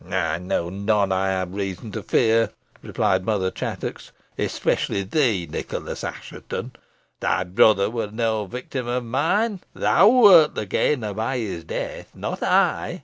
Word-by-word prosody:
"I 85 -3 -1
know 85 -1 -2
none 100 0 +1
I 95 +1 +1
have 95 -1 -2
reason 100 +2 -4
to - - -5
fear," 115 -1 +2 0.3
replied 95 0 0
Mother 95 -3 0
Chattox; - - -5 0.2
"especially 100 - -1
thee, 105 - +1
Nicholas 75 - -5
Assheton. - - -6 0.5
Thy - - 0
brother 100 +2 +4
was 110 -1 -4
no 110 -2 -1
victim 125 +3 -5
of 120 0 -2
mine. 180 - 0 0.2
Thou 195 +5 +5
wert 205 -11 +7
the 105 - -3
gainer 110 +1 0
by 115 +5 -2
his 100 -8 -4
death, - - -5
not - - -5
I. - - +1
105 Hz, 145 wpm, -23 LUFS, 95-125 Hz, 0.5 s, wert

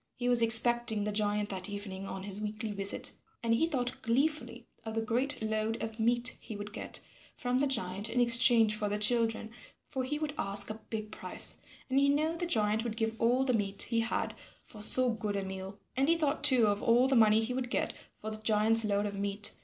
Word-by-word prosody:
He 245 - -4
was 245 -1 +3
expecting 230 -1 +5
the 210 - -2
giant 210 0 -1
that 190 0 -4
evening 195 -1 -6
on 190 -1 -6
his 200 +1 -6
weekly 215 +1 -4
visit, 200 -1 +2 0.3
and 230 0 +1
he 280 +8 +2
thought 250 -6 -2
gleefully 285 +7 -1 0.2
of 220 0 -6
the 225 - 0
great 255 +6 -1
load 220 +1 -1
of 225 0 -6
meat 240 +1 +3
he 220 - -8
would 205 +1 -8
get - - -5 0.3
from 250 +1 -1
the 285 - +1
giant 205 -4 -1
in 245 - -1
exchange 235 -2 +6
for 210 -1 -2
the 205 - -1
children, 225 0 0 0.4
for 260 - -4
he 285 +4 -3
would 300 -1 -4
ask 200 +2 -2
a 215 +1 -9
big 215 -1 -5
price, - - -5 0.3
and 265 +1 +1
he 280 0 +3
knew 310 +3 +1
the 345 +1 -3
giant 215 -6 0
would 230 -2 -5
give 225 0 -1
all 245 +3 +2
the 255 - +1
meat 200 -3 -2
he 230 -1 -1
had 230 +1 -2 0.3
for 215 - -13
so 250 +4 +2
good 210 -2 -4
a 195 -1 -3
meal. 190 +1 -7 0.2
And 270 +4 +1
he 335 - +3
thought 300 -2 -1
too 260 -6 +5
of 205 -1 0
all 240 +3 +3
the 265 - +1
money 220 -1 +4
he 240 +3 -3
would 250 -1 -3
get - - -2 0.2
for 215 - -6
the 215 - -6
giant's 220 +1 +3
load 205 -1 0
of 200 -1 -5
meat. 200 +1 0
225 Hz, 225 wpm, -30 LUFS, 210-245 Hz, 0.4 s, exchange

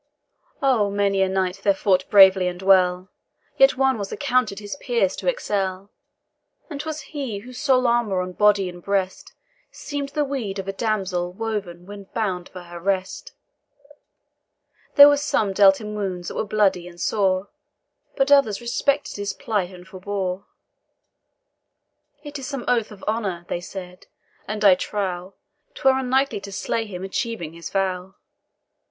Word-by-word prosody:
Oh, 240 -7 +3
many 200 -1 +1
a 190 - +2
knight 190 -1 -1
there 200 -1 +3
fought 185 -1 +1
bravely 190 -2 +7
and 180 0 -4
well, 185 -1 +3 0.5
Yet 270 -1 +5
one 265 -3 +2
was 200 -1 -5
accounted 255 -7 0
his 205 +3 -6
peers 235 -9 0
to - - -6
excel, 200 - -2 0.8
And 285 -1 -4
'twas 310 0 -5
he 270 -6 -5
whose 245 +6 -10
sole 260 -4 +3
armour 235 -5 +2
on 180 0 -5
body 205 0 +3
and 175 0 -9
breast 190 0 -2 0.4
Seem'd 285 -2 -5
the 295 +1 -1
weed 245 -8 -4
of 195 0 -5
a 195 - -2
damsel 190 -5 -1
when 200 -2 -5
bouned 185 -5 -2
for 180 - -10
her 175 0 -10
rest. 195 - -2 1.6
There 285 -1 +11
were 290 0 +5
some 220 -8 0
dealt 195 -1 +6
him 210 -1 -6
wounds 190 -4 -4
that - - -8
were - - -1
bloody 195 -4 +1
and 175 -1 -13
sore, 190 -1 0 0.7
But 275 0 +1
others 265 -8 +4
respected 280 +4 -1
his 205 0 -3
plight, 205 -6 -2
and 180 -1 -13
forbore. 190 0 -4 1.8
"It 290 -1 -7
is 260 - -6
some 275 -4 -5
oath 230 -3 +1
of 205 - -13
honour," 200 -6 -2
they 175 - -2
said, 180 0 -9 0.4
"and 215 0 -2
I 195 - +9
trow, 185 -1 -3 0.4
'Twere 265 - +3
unknightly 265 -2 +1
to 200 0 -9
slay 225 +3 -2
him 185 -2 -7
achieving 190 -4 -3
his 170 0 -8
vow." 190 -1 -2
200 Hz, 155 wpm, -23 LUFS, 185-240 Hz, 1.8 s, There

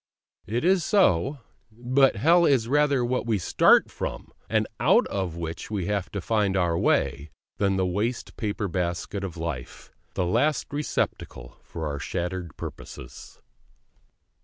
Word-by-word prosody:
It 115 - -1
is 185 -1 +4
so; 145 - +3 0.3
but 125 +4 +2
Hell 165 - +4
is 130 -8 +3
rather 140 -2 +2
what 125 0 -1
we 110 -2 +2
start 90 - +4
from, - - -5 0.2
and - - +2
out - - +4
of 95 -4 -3
which 85 0 -5
we 100 -4 -2
have 100 -2 -2
to 100 - -2
find 105 -2 +1
our 85 -2 +1
way, 70 -2 +1 0.3
than 100 -1 +1
the 95 -1 +1
waste 105 +7 -2
paper 105 -1 -2
basket 90 +2 -3
of 90 -3 -5
life, 80 -7 -6 0.2
the 90 - 0
last 135 +12 0
receptacle 145 - -3
for 80 -1 -7
our 70 -2 -3
shattered 90 +2 -4
purposes. - - -9
100 Hz, 145 wpm, -26 LUFS, 85-125 Hz, 0.3 s, is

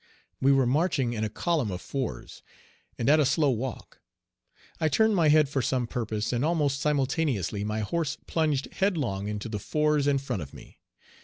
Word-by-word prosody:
We 135 - +5
were 135 -2 +4
marching 135 -2 +1
in 110 -2 -2
a 110 - -1
column 150 - -1
of 90 -2 -4
fours, 130 - -5 0.6
and 115 - -2
at 150 +2 +6
a - - +5
slow 145 +1 +2
walk. 125 0 -5 0.8
I 155 - +2
turned 220 +7 +3
my 165 -4 +3
head 155 -1 +5
for 135 -1 -1
some 125 0 0
purpose, 110 -1 -3
and 120 +2 0
almost 150 -4 +1
simultaneously 135 - 0
my 105 +1 -2
horse 150 +6 -2
plunged 155 -4 0
headlong 140 - -1
into 105 +1 -4
the 105 -2 -4
fours 150 +5 +1
in 140 -1 +3
front 135 -8 -3
of 70 - -9
me. - - -14
135 Hz, 180 wpm, -27 LUFS, 110-150 Hz, 0.8 s, at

